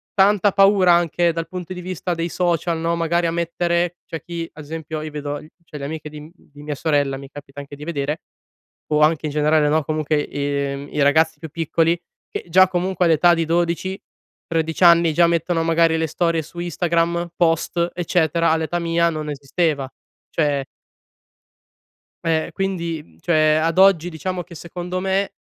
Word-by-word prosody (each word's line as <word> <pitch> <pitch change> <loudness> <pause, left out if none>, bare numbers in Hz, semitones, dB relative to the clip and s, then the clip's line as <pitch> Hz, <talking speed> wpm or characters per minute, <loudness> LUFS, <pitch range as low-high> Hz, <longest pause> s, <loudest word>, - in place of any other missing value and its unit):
tanta 205 +1 +4
paura 195 -2 +5
anche 170 0 +2
dal 165 0 -4
punto 180 0 -6
di 180 - -7
vista 180 0 -3
dei 165 0 -2
social, 170 -1 0
no, 165 +1 0
magari 170 +1 +1
a - - -1
mettere 170 +1 -1
c'è 165 - -6
chi, 170 -1 -5
ad 150 - -10
esempio, 160 0 -5
io 155 0 -6
vedo 145 -1 -4
i 155 - -14 0.2
cioè 150 - -9
le 140 - -5
amiche 155 0 -6
di 150 0 -10
m 155 +2 -13
di 145 -4 -16
mia 150 0 -4
sorella 145 -2 0
mi 135 0 -10
capita 145 0 -11
anche 140 0 -10
di 145 - -11
vedere 150 -1 -3 0.7
o 150 - +3
anche 155 0 +3
in - - -4
generale, 150 0 +2
no, 155 +1 +2
comunque 155 0 -1
i 140 -1 -3
i 150 - +1
ragazzi 155 +3 +3
più 160 - -7
piccoli, 165 +1 +1 0.3
che - - -5
già 185 +2 +6
comunque, 180 0 0
all'età 170 +1 +5
di 165 -1 0
12-13 170 -1 -3
anni, 170 -1 +6
già 170 +3 +5
mettono 170 0 0
magari 165 0 +3
le 160 - 0
storie 165 +1 0
su 170 +3 -11
Instagram, 170 0 0
post, 170 +1 +1
eccetera. 170 -1 +1
All'età 160 +1 0
mia, 170 0 +1
non 155 -2 -4
esisteva. 145 0 -1 0.4
Cioè 145 -4 0 1.6
ehm, 160 -1 +1
quindi, 170 -5 -3
mhmm, 80 -1 -24
cioè, 155 - +3
ad 165 +1 0
oggi, 190 -3 +5
diciamo 180 +2 -4
che 170 - -14
secondo 175 +2 -5
me, 195 +1 -1
165 Hz, 175 wpm, -21 LUFS, 150-175 Hz, 1.6 s, già